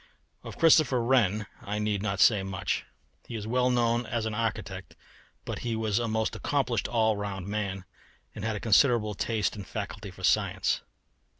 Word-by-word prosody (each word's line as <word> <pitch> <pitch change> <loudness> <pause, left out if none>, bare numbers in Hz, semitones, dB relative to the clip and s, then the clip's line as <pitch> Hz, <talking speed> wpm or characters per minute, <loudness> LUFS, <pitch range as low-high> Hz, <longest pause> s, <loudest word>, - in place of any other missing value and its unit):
Of - - -9
Christopher 150 -7 +5
Wren 110 -5 +2 0.2
I 100 +1 -4
need 105 -2 -1
not 100 -2 -2
say 105 -1 +5
much. 95 -1 -2 0.4
He 120 - -6
is 105 -2 -4
well 125 +2 +2
known 120 -1 +1
as 115 -3 -2
an 110 - -2
architect, 105 -4 -3 0.5
but - - -4
he 115 -2 -2
was 110 -1 0
a 120 - -1
most 110 0 -1
accomplished 130 -5 0
all 110 -2 +2
round 100 -2 -4
man, 100 -2 -3 0.5
and - - -7
had 110 -1 -1
a - - -3
considerable 115 -1 +3
taste 110 +2 -1
and 100 -3 -8
faculty 105 -1 -5
for 95 0 -13
science. 95 -1 +2
110 Hz, 175 wpm, -28 LUFS, 100-115 Hz, 0.5 s, Christopher